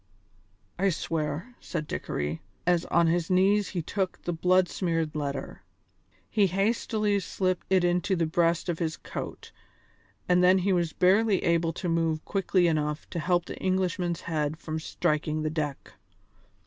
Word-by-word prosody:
"I 195 Hz, +1 st, +3 dB
swear," 160 Hz, +5 st, -3 dB
said 160 Hz, -3 st, -4 dB
Dickory, 75 Hz, -, -3 dB, 0.2 s
as 175 Hz, -1 st, +2 dB
on 170 Hz, 0 st, +3 dB
his 165 Hz, 0 st, +1 dB
knees 195 Hz, +2 st, +3 dB
he 175 Hz, -4 st, -3 dB
took 190 Hz, +3 st, -2 dB
the 175 Hz, -, -2 dB
blood 180 Hz, +2 st, +3 dB
smeared 165 Hz, -5 st, -1 dB
letter. 140 Hz, -9 st, -4 dB, 0.7 s
He 205 Hz, -3 st, +3 dB
hastily 205 Hz, +2 st, +1 dB
slipped 185 Hz, 0 st, -2 dB
it 190 Hz, -1 st, +4 dB
into 175 Hz, +2 st, +1 dB
the 170 Hz, -2 st, +1 dB
breast 170 Hz, +1 st, +1 dB
of 170 Hz, -2 st, -2 dB
his 160 Hz, -2 st, -2 dB
coat, -, -, -7 dB, 0.8 s
and 180 Hz, 0 st, +4 dB
then 185 Hz, +1 st, +6 dB
he 190 Hz, +1 st, +1 dB
was 170 Hz, -3 st, +1 dB
barely 195 Hz, +4 st, +3 dB
able 170 Hz, 0 st, +2 dB
to 175 Hz, -, -4 dB
move 165 Hz, -2 st, 0 dB
quick 195 Hz, -1 st, -3 dB
enough 155 Hz, -4 st, +2 dB
to 170 Hz, -, -3 dB
keep 175 Hz, -2 st, +2 dB
the -, -, -7 dB
Englishman's 180 Hz, -2 st, 0 dB
head 155 Hz, -2 st, -2 dB
from 155 Hz, 0 st, -4 dB
striking 155 Hz, 0 st, -1 dB
the 155 Hz, -, -1 dB
deck. 150 Hz, -3 st, -4 dB
175 Hz, 155 wpm, -27 LUFS, 160-185 Hz, 0.8 s, then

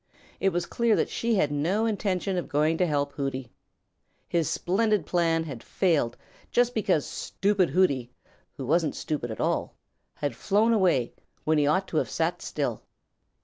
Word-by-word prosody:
It 195 Hz, -, +3 dB
was 175 Hz, -1 st, -1 dB
clear 230 Hz, +4 st, +2 dB
that -, -, 0 dB
she 230 Hz, -1 st, 0 dB
had 150 Hz, -7 st, +2 dB
no 175 Hz, +10 st, +1 dB
intention 195 Hz, -3 st, -1 dB
of 175 Hz, -, -3 dB
going 155 Hz, +3 st, +2 dB
to 180 Hz, -, +3 dB
help 145 Hz, -2 st, 0 dB
Hooty. 135 Hz, -3 st, -4 dB, 0.8 s
His 165 Hz, -3 st, 0 dB
splendid 205 Hz, -1 st, +1 dB
plan 165 Hz, -2 st, +1 dB
had 140 Hz, -8 st, -7 dB
failed 155 Hz, -11 st, +1 dB, 0.3 s
just 245 Hz, 0 st, +2 dB
because 190 Hz, -, +1 dB
stupid 195 Hz, -3 st, 0 dB
Hooty, 135 Hz, -7 st, +2 dB, 0.4 s
who 135 Hz, -, -6 dB
wasn't 160 Hz, +3 st, +1 dB
stupid 145 Hz, -6 st, -3 dB
at 110 Hz, -, -6 dB
all, -, -, -1 dB, 0.4 s
had 145 Hz, -1 st, -3 dB
flown 215 Hz, +3 st, +2 dB
away 175 Hz, -, +2 dB, 0.3 s
when 155 Hz, 0 st, +2 dB
he 145 Hz, -, +3 dB
ought 190 Hz, +6 st, +2 dB
to -, -, -2 dB
have -, -, +1 dB
sat -, -, -1 dB
still. -, -, -3 dB
170 Hz, 165 wpm, -27 LUFS, 145-195 Hz, 0.8 s, It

